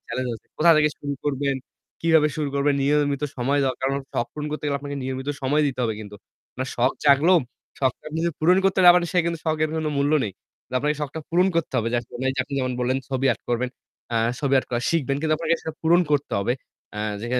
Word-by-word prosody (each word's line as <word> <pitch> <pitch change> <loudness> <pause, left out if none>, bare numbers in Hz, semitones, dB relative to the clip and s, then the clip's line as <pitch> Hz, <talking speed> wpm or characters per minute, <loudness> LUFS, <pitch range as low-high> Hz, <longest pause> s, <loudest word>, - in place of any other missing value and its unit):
Challenge 130 -1 -2
আছে। 110 - -13
কোথা 170 +2 +6
থেকে 150 0 +4
শুরু 145 0 -4
করবেন, 140 -1 0 0.5
কিভাবে 160 -2 +4
শুরু 150 -2 -1
করবেন, 140 0 +2
নিয়মিত 145 0 +1
সময় 140 +3 +1
দরকার। 130 - -2
কারণ 135 - 0
শখ 120 - 0
পূরণ 150 0 -5
করতে 150 0 -5
গেলে 140 -1 0
আপনাকে 140 0 -5
নিয়মিত 130 +2 -4
সময় 145 +3 +2
দিতে 135 -2 -3
হবে 115 -2 0
কিন্তু। 105 -1 -9 0.3
আপনার 130 +1 -5
শখ 125 +2 +3
জাগলো, 145 +5 +5 0.5
শখটা 130 -2 0
জাগলেও 155 +1 -4
কিন্তু 170 - 0
পূরণ 180 +4 +5
করতে 195 0 +2
না - - +12
পারলে 175 -1 +3
সে 180 - +2
কিন্তু 170 -1 -1
শখের 155 0 +1
কোন 160 -1 -1
মূল্য 140 +2 +2
নেই। 100 - -4 0.4
তো - - -20
আপনাকে 150 +2 0
শখটা 150 +2 -4
পূরণ 180 +2 +4
করতে 165 - -1
হবে। 115 - 0
যে - - +2
আসলেই 130 +3 -3
আপনি 140 - -7
যেমন 130 -1 -1
বললেন 130 +2 +1
ছবি 135 0 0
আর্ট - - -10
করবেন, 120 +1 0 0.7
ছবি 140 -1 +1
আর্ট - - -2
করা 120 -1 0
শিখবেন। 140 -5 0
কিন্তু 155 0 +2
আপনাকে 165 +1 +1
সেটা 160 - -5
পূরণ 170 +2 +5
করতে 145 -1 0
হবে। 100 +5 +1 0.4
আ - - -4 0.2
যে 115 - -5
145 Hz, 225 wpm, -24 LUFS, 130-155 Hz, 0.7 s, না